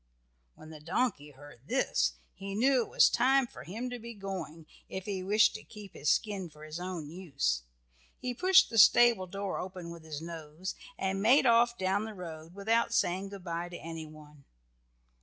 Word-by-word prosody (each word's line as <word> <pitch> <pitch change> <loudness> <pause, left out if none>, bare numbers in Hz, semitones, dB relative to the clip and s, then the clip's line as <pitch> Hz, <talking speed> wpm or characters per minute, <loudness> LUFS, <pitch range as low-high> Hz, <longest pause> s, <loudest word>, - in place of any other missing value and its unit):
When 155 - -13
the 155 - -10
donkey 165 - -1
heard 140 -2 -15
this - - +1 0.2
he 195 +1 -6
knew 255 +3 +4
it - - -15
was - - +6
time 265 +1 +3
for - - -11
him 220 +9 -5
to 245 - -5
be 235 0 -9
going, 185 -5 -6 0.2
if 190 0 -5
he 195 -3 -3
wished 210 +3 +4
to 215 - -8
keep 210 -3 -12
his 145 - -1
skin 200 -5 0
for 150 0 -15
his 155 +2 -6
own 175 -5 -5
use. 135 - -1 0.6
He 250 -1 -3
pushed 370 +8 +5
the 225 - +2
stable 230 -2 +6
door 195 +1 -4
open 180 -2 -6
with 170 -1 -10
his 155 -2 -6
nose, 165 +2 -6 0.2
and 190 0 -1
made 255 +6 +5
off 235 0 +4
down 190 +3 0
the 220 -1 -7
road 165 -2 -9
without 230 +3 +1
saying 190 +3 0
good 200 -2 -10
by 170 0 -4
to 175 - -7
anyone. 155 -3 -10
185 Hz, 185 wpm, -31 LUFS, 160-215 Hz, 0.6 s, was